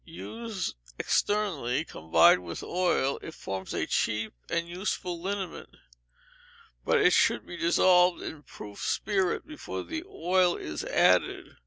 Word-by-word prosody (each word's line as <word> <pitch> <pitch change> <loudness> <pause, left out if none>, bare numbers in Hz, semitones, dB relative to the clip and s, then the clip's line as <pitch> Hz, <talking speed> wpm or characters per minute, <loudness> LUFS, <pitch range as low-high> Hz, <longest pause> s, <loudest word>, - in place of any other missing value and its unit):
Used 210 - -6 0.2
externally, 165 - 0
combined 80 - +4
with 85 -1 -6
oil, 175 -6 0
it 160 - -9
forms 95 -1 -6
a - - -1
cheap 110 0 -1 0.2
and 170 0 -1
useful 180 -1 -3
liniment, 190 -1 -5 1.1
but - - +3
it - - +5
should - - +3
be - - -8
dissolved 180 +1 +4
in 155 - -7
proof 105 -7 -11
spirit 190 -4 0
before 305 0 -6
the 325 0 -5
oil 180 - +2
is 75 -1 -5
added. - - +2
175 Hz, 130 wpm, -28 LUFS, 130-190 Hz, 1.1 s, it